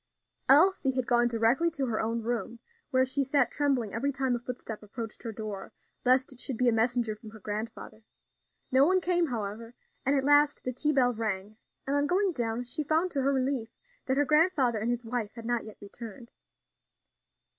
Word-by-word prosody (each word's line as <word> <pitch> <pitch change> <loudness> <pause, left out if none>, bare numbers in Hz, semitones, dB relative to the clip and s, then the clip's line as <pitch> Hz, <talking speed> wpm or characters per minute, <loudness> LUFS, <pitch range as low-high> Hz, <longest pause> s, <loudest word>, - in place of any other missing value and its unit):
Elsie 290 -2 +5
had 255 -2 0
gone 240 0 +3
directly 235 +8 +2
to 285 -5 -3
her 225 -3 -1
own 230 +1 -2
room, 235 0 -3 0.3
where 260 0 +3
she 265 +2 0
sat 270 -2 +2
trembling 265 -8 0
every 275 +5 0
time 265 -2 0
a - - -3
footstep 240 -3 -7
approached 220 +1 -7
her 230 - -5
door, 215 -3 -6 0.3
lest 260 +1 +3
it 250 - -16
should 255 -2 -1
be 250 - +2
a - - +5
messenger 230 -1 +1
from 215 +1 -12
her 220 0 -12
grandfather. 215 +2 -6 0.7
No 260 +1 +5
one 370 +5 +4
came, 350 -1 +2
however, 230 -1 -5 0.3
and 275 +2 +2
at 270 - +1
last 290 +1 +4
the 255 - -3
tea 300 +5 +1
bell 250 -4 +3
rang, 215 -2 -3 0.3
and 275 - 0
on 285 0 +2
going 380 +4 +2
down 235 -4 -2
she 245 +5 -2
found 320 +5 +1
to 280 - -1
her 275 +1 +2
relief 260 -3 -1 0.4
that 265 0 +1
her 290 - +3
grandfather 300 -7 +3
and 220 +3 -1
his 240 0 -2
wife 225 -2 -3
had 230 -1 -9
not 240 -1 -1
yet 215 - -10
returned. 230 +3 -10
245 Hz, 200 wpm, -29 LUFS, 225-275 Hz, 0.7 s, Elsie